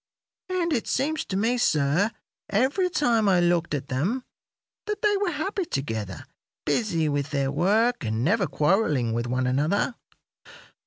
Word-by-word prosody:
And 350 -3 0
it 235 - -1
seemed 305 +4 0
to 190 - -1
me, 235 +4 +1
sir, 155 +2 +2 0.4
every 270 - +2
time 235 - +2
I 185 -2 +4
looked 175 -2 +1
at 140 -1 -5
them, 180 - -1 0.6
that 420 0 -3
they 415 -1 +4
were 400 -2 0
happy 375 +5 -2
together, 110 - -4 0.4
busy 165 -1 +1
with 145 -1 -1
their 140 -1 0
work 215 - +2
and 110 +1 -1
never 190 - +2
quarrelling 150 - +1
with 120 +1 -1
one 125 +1 0
another. 150 - +1
185 Hz, 150 wpm, -25 LUFS, -, 0.6 s, I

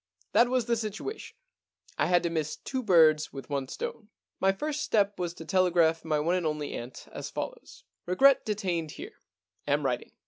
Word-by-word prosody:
That 240 +1 +5
was 250 -2 +1
the 235 0 +1
situation. 220 - -5 0.6
I - - +1
had 175 -1 +3
to 170 - -1
miss 155 -2 -2
two 260 -1 -4
birds 160 -7 +5
with 135 +1 -9
one 140 -2 -1
stone. 210 - -6
* - - -62
My 195 - +5
first 300 +9 -3
step 205 -5 +1
was 175 -1 -3
to 165 - -9
telegraph 175 -3 +3
to - - -13
my 155 -1 +1
one 165 +4 +1
and 180 -3 +1
only 150 -1 -3
aunt 120 +2 -8
as - - -6
follows: - - -7 0.2
Regret 270 +10 +5
detained 180 -7 -2
here. - - -10 0.5
Am 145 0 +1
writing.' 125 -2 -2
180 Hz, 195 wpm, -28 LUFS, 155-220 Hz, 0.6 s, That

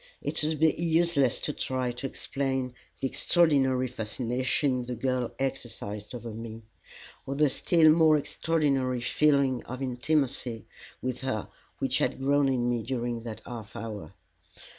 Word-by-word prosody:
It - - +1
would 155 -1 0
be 160 0 +5
useless 165 -6 +3
to 150 - 0
try 130 -2 -1
to 120 +3 -4
explain 130 -2 -2 0.3
the 135 - 0
extraordinary 135 -5 +3
fascination 125 +3 -1
the 125 0 -4
girl 125 0 -1
exercised 115 -5 -4
over 120 -1 -6
me, 115 0 -8 0.6
or 135 - -2
the 150 -1 +3
still 160 +1 +5
more 160 -1 +5
extraordinary 140 -5 0
feeling 140 -1 +2
of 130 +1 -6
intimacy 125 -3 -1 0.4
with 130 -1 -2
her 130 -6 -2 0.3
which - - +1
had - - 0
grown 140 +1 +3
in 125 -2 +1
me 120 -1 0
during 120 -1 -3
that 115 -2 -7
half 115 -4 -8
hour. 105 -4 -6
130 Hz, 140 wpm, -28 LUFS, 120-140 Hz, 0.6 s, be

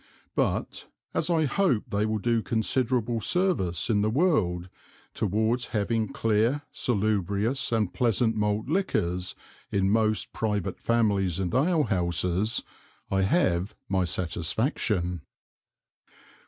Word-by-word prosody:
But, - - -1 0.3
as 160 +1 0
I 165 -2 +3
hope 145 - 0
they 105 +1 +1
will 110 0 0
do 115 +2 +1
considerable 115 +2 0
Service 130 - +1
in 105 -3 +2
the 105 - +1
World 110 - +1 0.5
towards 110 +4 0
having 110 +1 0
clear 115 +6 +1
salubrious 105 +3 0
and 110 -5 0
pleasant 115 -1 +1
Malt 105 0 0
Liquors 95 - -1 0.4
in 95 0 +1
most 110 -1 +1
private 105 -4 -2
Families 100 -6 +1
and 95 0 -2
Alehouses, 105 - +1 0.5
I 95 0 +2
have 95 - +1
my 95 -1 +1
Satisfaction. 90 - -1
110 Hz, 110 wpm, -27 LUFS, 95-120 Hz, 0.5 s, I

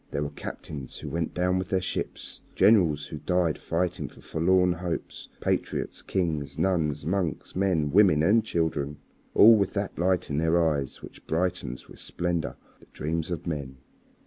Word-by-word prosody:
There 70 - -2
were 75 - -4
captains 70 -4 -7
who - - -6
went 85 0 -2
down 90 +1 +1
with 95 - -4
their 95 - +2
ships, 95 - -4
generals 85 -9 +4
who 75 - -7
died 90 -3 +1
fighting 85 +1 -1
for - - -16
forlorn 90 +2 +2
hopes, 85 0 -5
patriots, - - -1
kings, 80 -6 -2
nuns, 80 -6 0
monks, 90 -2 -2
men, 90 -6 +1
women, 90 -5 +5
and 110 +6 +4
children 80 -6 -1 0.4
all 115 +2 +9
with 100 -3 +1
that 100 -4 -3
light 90 -2 +1
in 70 - 0
their 80 +2 +3
eyes 75 -5 0
which - - -12
brightens 80 -7 -2
with - - -14
splendor 85 -2 -2 0.2
the - - -20
dreams 80 +2 -2
of 85 -2 -4
men. 70 -5 -4
85 Hz, 165 wpm, -27 LUFS, 75-90 Hz, 0.4 s, all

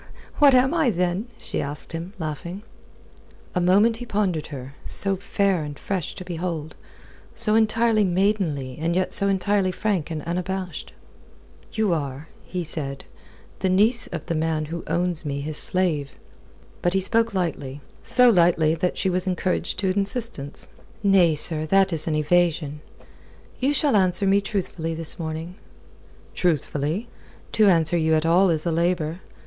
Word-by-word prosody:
"What 285 -3 +7
am 260 +4 +4
I, 320 -6 +2
then?" 180 +2 -1
she - - -4
asked 145 0 -5
him, 170 +4 -6
laughing. 170 +4 -5 0.9
A 180 - 0
moment 205 +6 +4
he 245 - -7
pondered 195 -8 -1
her, 135 -2 -8
so 195 -1 +1
fair 195 -2 0
and 145 -1 -7
fresh 190 -6 -4
to 185 - -8
behold, 165 -3 -4 0.6
so 220 -2 +3
entirely 220 0 +3
maidenly 175 -8 0
and 170 +1 0
yet 185 0 0
so 200 - +3
entirely 195 0 +1
frank 190 -5 -1
and 155 -3 -4
unabashed. 180 +1 -4 0.8
"You 215 -5 +1
are," 145 -1 -4 0.2
he 180 -1 -4
said, 140 -4 -1 0.5
"the 190 - 0
niece 215 +6 +3
of 165 -4 -6
the - - -2
man 160 -1 -1
who 165 +2 -6
owns 170 +1 0
me 140 -2 -3
his 150 +1 -4
slave." 165 -7 0 0.7
But 175 +1 0
he - - +4
spoke 225 +2 +1
lightly. 145 -6 -3 0.2
So 245 +1 +6
lightly 170 -4 +3
that 175 +2 -1
she - - 0
was 185 0 0
encouraged 185 0 -1
to 190 -2 0
insistence. 200 - -3 0.4
"Nay, 185 -5 +4
sir, 155 +1 +1
that 195 +1 +3
is 155 0 -1
an 155 - 0
evasion. 155 -1 +1 0.8
You 265 +3 +2
shall 290 -3 +3
answer 185 0 +3
me 195 +1 +4
truthfully 180 -5 -3
this 165 +1 -3
morning." 160 +3 -5 0.8
"Truthfully? 160 - -1 0.4
To 215 -1 +4
answer 170 -2 +4
you 160 0 +2
at 155 +1 +1
all 180 +3 +4
is 160 -1 0
a 170 - +1
labour. 170 0 0
180 Hz, 155 wpm, -23 LUFS, 160-195 Hz, 0.9 s, What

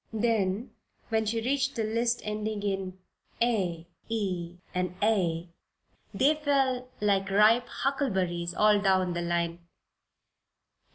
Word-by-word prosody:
Then, 220 -1 0 0.4
when 220 -1 +1
she 225 +1 0
reached 270 +2 0
the 225 - -1
list 230 +2 0
ending 210 0 -3
in 195 -2 -2 0.4
"ay, 185 -9 0 0.2
ey 180 -6 -2 0.2
and 180 -1 -2
eigh" 180 -6 +1 0.6
they 285 +3 +3
fell 270 -4 0
like 195 -2 +1
ripe 215 +5 +5
huckleberries 190 -11 -1
all 210 -1 +5
down 185 -2 +2
the 175 - -2
line. 170 0 -1
210 Hz, 115 wpm, -28 LUFS, 180-235 Hz, 0.6 s, ripe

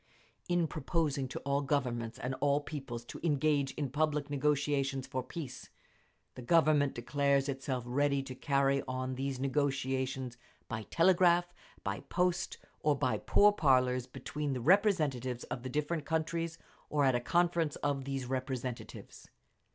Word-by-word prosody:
In 175 -1 +3
proposing 150 -2 -1
to - - -6
all 140 0 0
Governments 125 -5 -1
and 130 +1 -3
all 145 0 +3
peoples 135 -6 -6
to - - -8
engage 145 -3 +2
in 140 -4 -3
public 150 -1 0
negotiations 140 -2 +1
for 130 - -3
peace, 130 - -7 0.6
the 125 - -9
Government 150 0 +3
declares 140 +3 +1
itself 135 -2 -2
ready 140 +2 +1
to 135 -1 -7
carry 140 +1 +1
on 130 0 -2
these 135 0 -3
negotiations 135 -2 -1 0.3
by 110 -2 -5
telegraph, 175 0 +4 0.3
by - - -2
post, 180 0 -1 0.2
or 150 -1 +2
by 130 -2 0
pourparlers 130 -11 +3
between 145 +2 -3
the 130 - -2
representatives 145 - +2
of 125 - -5
the 130 - -5
different 150 +3 -1
countries, 165 +1 -1 0.3
or 145 -2 +2
at 130 - +4
a 120 - +2
conference 170 +3 +1
of 140 -2 -2
these 135 -2 -3
representatives. 130 -1 -5
140 Hz, 140 wpm, -32 LUFS, 130-155 Hz, 0.6 s, telegraph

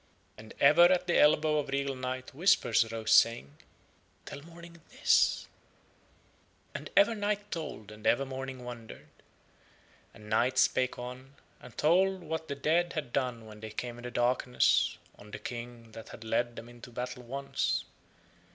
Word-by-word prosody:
And 110 0 -13
ever 155 +5 +7
at 180 0 +3
the 175 - +2
elbow 150 0 +4
of 145 - -4
regal 140 0 -1
Night 130 0 -5
whispers 140 - +3
arose 115 -1 -4
saying: 95 -12 +4 0.7
"Tell 140 - -8
Morning 170 +1 -14
this." - - +2 1.3
And - - -6
ever 300 -6 +6
Night 205 -1 -2
told 145 - -6
and 105 0 -6
ever 135 +3 +3
Morning 130 -1 -6
wondered. 115 -2 -10 1.0
And 105 - -15
Night 120 +4 +1
spake 130 0 +2
on, 125 +2 -9 0.2
and 125 -3 -14
told 185 +4 +2
what 160 0 -4
the 140 - -4
dead 165 +5 +1
had 145 -6 -5
done 125 -4 -2
when 105 -1 -12
they 110 0 -7
came 120 +2 -6
in - - -11
the 125 - -5
darkness 125 +1 +2 0.2
on 105 - -13
the - - -7
King 120 -1 -8
that 110 0 -11
had 115 - -10
led 120 +2 -1
them 115 - -9
into 120 0 -12
battle 125 +1 -5
once. 135 +3 -2
130 Hz, 160 wpm, -30 LUFS, 120-155 Hz, 1.3 s, ever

